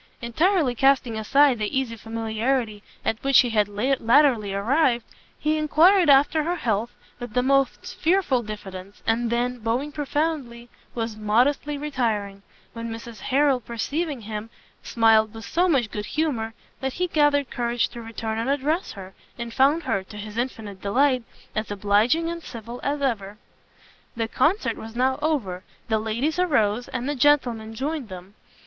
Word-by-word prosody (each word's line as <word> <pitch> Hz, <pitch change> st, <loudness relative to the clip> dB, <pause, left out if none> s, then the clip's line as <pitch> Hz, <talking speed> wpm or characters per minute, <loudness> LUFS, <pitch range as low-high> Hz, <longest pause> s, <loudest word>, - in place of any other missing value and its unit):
Entirely 300 Hz, -, +1 dB
casting 265 Hz, -2 st, +2 dB
aside 260 Hz, +3 st, +3 dB
the 210 Hz, +4 st, -1 dB
easy 240 Hz, -4 st, -4 dB
familiarity 225 Hz, 0 st, -2 dB, 0.2 s
at 225 Hz, -, -1 dB
which 275 Hz, -1 st, +6 dB
he 245 Hz, -2 st, -2 dB
had 210 Hz, -2 st, +2 dB
latterly 235 Hz, 0 st, +2 dB
arrived, 235 Hz, +4 st, +1 dB, 0.3 s
he 305 Hz, +1 st, 0 dB
enquired 330 Hz, +4 st, +5 dB
after 285 Hz, +3 st, +5 dB
her 340 Hz, +4 st, -1 dB
health 230 Hz, -, -1 dB, 0.3 s
with 240 Hz, -3 st, -8 dB
the 250 Hz, -, +3 dB
most 275 Hz, -1 st, +1 dB
fearful 330 Hz, -7 st, +2 dB
diffidence, 200 Hz, -3 st, -9 dB
and 230 Hz, +1 st, +1 dB
then, 245 Hz, +1 st, -1 dB
bowing 235 Hz, +6 st, -1 dB
profoundly, 290 Hz, -5 st, -3 dB, 0.3 s
was 225 Hz, -2 st, -3 dB
modestly 250 Hz, +8 st, +1 dB
retiring; 225 Hz, -9 st, -2 dB, 0.3 s
when 230 Hz, 0 st, -5 dB
Mrs 225 Hz, -1 st, -8 dB
Harrel 270 Hz, +4 st, +2 dB
perceiving 275 Hz, +5 st, -3 dB
him, 215 Hz, +1 st, -6 dB, 0.3 s
smiled 225 Hz, -1 st, +3 dB
with 225 Hz, -, -8 dB
so 360 Hz, +2 st, +1 dB
much 250 Hz, -9 st, +1 dB
good 210 Hz, 0 st, -5 dB
humour, 240 Hz, -8 st, -2 dB, 0.2 s
that 265 Hz, -1 st, -3 dB
he 360 Hz, -, -1 dB
gathered 290 Hz, -5 st, +2 dB
courage 240 Hz, 0 st, 0 dB
to 235 Hz, -, -9 dB
return 225 Hz, -1 st, -4 dB
and 230 Hz, +3 st, -1 dB
address 295 Hz, +6 st, 0 dB
her, 190 Hz, -2 st, -10 dB, 0.2 s
and 235 Hz, -1 st, -6 dB
found 280 Hz, +6 st, +3 dB
her, 225 Hz, -7 st, 0 dB
to 210 Hz, -, -11 dB
his 210 Hz, +1 st, -8 dB
infinite 220 Hz, -5 st, -4 dB
delight, 255 Hz, +5 st, +2 dB, 0.3 s
as 215 Hz, 0 st, -2 dB
obliging 210 Hz, +10 st, +2 dB
and 335 Hz, 0 st, -4 dB
civil 235 Hz, -3 st, -8 dB
as 285 Hz, 0 st, -2 dB
ever. 210 Hz, -6 st, -2 dB, 0.8 s
The 225 Hz, -1 st, -1 dB
Concert 340 Hz, -, +1 dB
was 225 Hz, +1 st, -9 dB
now 260 Hz, +2 st, +1 dB
over; 225 Hz, -, -1 dB, 0.3 s
the 220 Hz, -1 st, +2 dB
ladies 235 Hz, +10 st, -1 dB
arose, 245 Hz, -, +1 dB
and 245 Hz, -, -4 dB
the 290 Hz, -, 0 dB
gentlemen 245 Hz, -6 st, +2 dB
joined 280 Hz, -1 st, -3 dB
them. 185 Hz, +1 st, -10 dB
240 Hz, 155 wpm, -24 LUFS, 220-285 Hz, 0.8 s, which